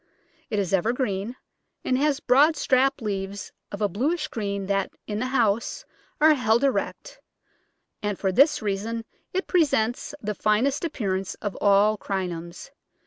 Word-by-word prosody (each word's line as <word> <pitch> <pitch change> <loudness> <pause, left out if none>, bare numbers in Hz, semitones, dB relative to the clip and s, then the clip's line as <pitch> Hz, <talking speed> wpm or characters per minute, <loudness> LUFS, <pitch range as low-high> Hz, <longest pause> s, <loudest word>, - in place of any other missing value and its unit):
It 215 - -1
is 195 -2 -1
evergreen, 220 +1 0 0.5
and 255 - +2
has 285 +1 +1
broad 295 +5 +4
strap 270 -2 +2
leaves 200 -1 -4 0.2
of 205 +1 -4
a - - +4
bluish 295 - -1
green 200 -3 -3
that, 195 0 0 0.2
in 210 0 -3
the 255 - -1
house, 230 -4 0 0.3
are 310 +1 +7
held 240 -3 +2
erect, 275 -2 -1 0.8
and 205 -2 -2
for 190 - 0
this 275 - +4
reason 215 +3 -2 0.3
it 375 +1 -1
presents 285 - +1
the 210 0 -3
finest 225 - +1
appearance 195 - -2
of 205 -2 -5
all 205 +1 +4
Crinums. 175 -3 -5
220 Hz, 140 wpm, -25 LUFS, 200-270 Hz, 0.8 s, are